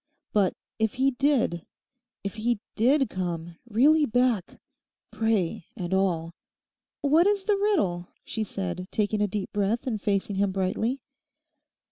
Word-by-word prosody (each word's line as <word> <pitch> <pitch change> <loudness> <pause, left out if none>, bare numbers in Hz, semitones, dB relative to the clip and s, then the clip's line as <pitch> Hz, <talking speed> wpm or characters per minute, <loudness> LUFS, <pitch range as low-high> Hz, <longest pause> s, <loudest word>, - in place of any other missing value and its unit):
But 200 -3 +3 0.3
if 220 +2 +1
he 265 +1 +3
did, 250 - +1 0.6
if 200 - -3
he 225 0 0 0.2
did, 265 +5 +3
come 175 -3 -4
really 290 +7 +4
back: 240 -5 +1 0.5
"prey" 215 -7 0
and 180 -2 -3
all?' 170 -4 +1 0.7
'What 310 +6 +4
is 405 -1 +2
the 415 0 +2
riddle?' 310 - +1 0.2
she 220 - -2
said, 185 -2 -4
taking 210 0 0
a 210 - +3
deep 200 -1 -4
breath 210 +5 0
and 220 -6 -2
facing 200 -1 0
him 200 0 +2
brightly. 205 +7 -1
215 Hz, 135 wpm, -27 LUFS, 190-255 Hz, 0.7 s, really